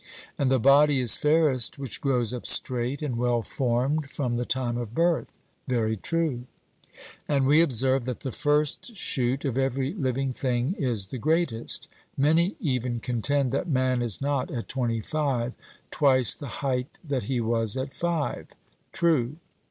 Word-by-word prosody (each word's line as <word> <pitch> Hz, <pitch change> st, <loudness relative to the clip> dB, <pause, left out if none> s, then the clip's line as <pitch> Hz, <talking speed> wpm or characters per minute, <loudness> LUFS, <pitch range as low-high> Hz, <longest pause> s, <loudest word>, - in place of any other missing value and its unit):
And 140 Hz, -, 0 dB
the 130 Hz, -, +4 dB
body 140 Hz, +3 st, +5 dB
is 120 Hz, -4 st, +5 dB
fairest 150 Hz, -6 st, +2 dB
which 135 Hz, -4 st, -6 dB
grows 125 Hz, -4 st, +1 dB
up 125 Hz, -, -5 dB
straight 125 Hz, +3 st, +3 dB
and 125 Hz, -6 st, -2 dB
well 120 Hz, -1 st, +1 dB
formed 135 Hz, +4 st, -1 dB
from 125 Hz, -4 st, -2 dB
the 120 Hz, 0 st, -2 dB
time 125 Hz, -2 st, -1 dB
of 120 Hz, -1 st, -5 dB
birth. 170 Hz, 0 st, 0 dB, 0.3 s
'Very 115 Hz, -4 st, 0 dB
true.' 150 Hz, -, -2 dB, 0.8 s
And 140 Hz, -2 st, +1 dB
we 150 Hz, +4 st, +5 dB
observe 130 Hz, -3 st, +2 dB
that 125 Hz, -2 st, -5 dB
the 130 Hz, -, -4 dB
first 150 Hz, -, 0 dB
shoot 130 Hz, -2 st, 0 dB
of 135 Hz, -1 st, -1 dB
every 135 Hz, +2 st, -1 dB
living 135 Hz, -, -2 dB
thing 125 Hz, +4 st, -1 dB
is 120 Hz, -8 st, 0 dB
the 130 Hz, -, -4 dB
greatest; 155 Hz, -5 st, 0 dB, 0.3 s
many 160 Hz, +7 st, +2 dB
even 125 Hz, -, -1 dB
contend 125 Hz, +3 st, 0 dB
that 140 Hz, +6 st, -2 dB
man 130 Hz, -3 st, +1 dB
is 115 Hz, -2 st, 0 dB
not 140 Hz, -2 st, -1 dB
at 120 Hz, -3 st, -5 dB
twenty 120 Hz, -4 st, -1 dB
five 130 Hz, -3 st, -1 dB, 0.4 s
twice 130 Hz, -4 st, +3 dB
the 145 Hz, -, -7 dB, 0.2 s
height 125 Hz, -1 st, -2 dB
that 135 Hz, -7 st, -2 dB
he 130 Hz, -2 st, 0 dB
was 115 Hz, -1 st, 0 dB
at 130 Hz, +1 st, -4 dB
five. 170 Hz, +1 st, -2 dB, 0.4 s
'True.' 155 Hz, -8 st, +1 dB
130 Hz, 160 wpm, -26 LUFS, 120-145 Hz, 0.8 s, body